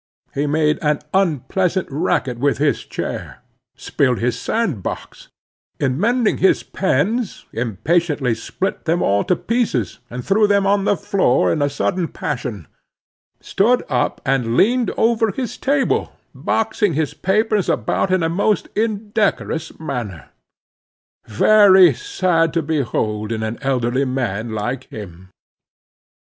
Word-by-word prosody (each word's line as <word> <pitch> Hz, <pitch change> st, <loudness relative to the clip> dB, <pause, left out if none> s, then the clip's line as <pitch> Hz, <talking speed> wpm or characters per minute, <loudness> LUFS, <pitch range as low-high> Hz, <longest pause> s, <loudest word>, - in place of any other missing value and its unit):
He 145 Hz, +2 st, -1 dB
made 150 Hz, 0 st, +1 dB
an 150 Hz, -1 st, +1 dB
unpleasant 185 Hz, +1 st, 0 dB
racket 135 Hz, -4 st, -1 dB
with 140 Hz, +2 st, +1 dB
his 145 Hz, 0 st, +1 dB
chair; -, -, -6 dB, 0.3 s
spilled 125 Hz, -4 st, 0 dB
his 120 Hz, +1 st, -1 dB
sand 195 Hz, -, -1 dB
box; -, -, -7 dB, 0.5 s
in 130 Hz, 0 st, 0 dB
mending 235 Hz, +2 st, +1 dB
his 190 Hz, -, +3 dB
pens, 195 Hz, -, -1 dB
impatiently 135 Hz, -, 0 dB
split 190 Hz, +11 st, -4 dB
them 170 Hz, +1 st, +1 dB
all 100 Hz, +1 st, +2 dB
to 180 Hz, -, +2 dB
pieces, 215 Hz, -, -1 dB
and 125 Hz, +1 st, -6 dB
threw 210 Hz, +2 st, +3 dB
them 200 Hz, -1 st, +2 dB
on 200 Hz, 0 st, +2 dB
the 205 Hz, -, +2 dB
floor 125 Hz, -, +2 dB
in -, -, -1 dB
a 145 Hz, -, +2 dB
sudden 170 Hz, +5 st, -1 dB
passion; 105 Hz, -, -5 dB, 0.8 s
stood 240 Hz, +6 st, +2 dB
up 125 Hz, -3 st, 0 dB
and 125 Hz, -3 st, 0 dB
leaned 240 Hz, +3 st, +3 dB
over 225 Hz, -1 st, +2 dB
his 245 Hz, +4 st, -4 dB
table, 275 Hz, 0 st, 0 dB, 0.2 s
boxing 220 Hz, -4 st, 0 dB
his 155 Hz, -1 st, -1 dB
papers 210 Hz, +1 st, +1 dB
about 115 Hz, -, 0 dB
in 185 Hz, -2 st, +2 dB
a -, -, +2 dB
most 200 Hz, +5 st, 0 dB
indecorous 210 Hz, -6 st, -1 dB
manner, 120 Hz, -, -5 dB, 1.0 s
very 190 Hz, -, +6 dB
sad 180 Hz, -, 0 dB
to 165 Hz, -, +1 dB
behold 115 Hz, -8 st, -1 dB
in 110 Hz, -1 st, -2 dB
an 110 Hz, +1 st, -4 dB
elderly 130 Hz, -1 st, 0 dB
man 120 Hz, -4 st, -2 dB
like 120 Hz, +5 st, -3 dB
him. 95 Hz, -3 st, -10 dB
160 Hz, 130 wpm, -19 LUFS, 125-200 Hz, 1.0 s, very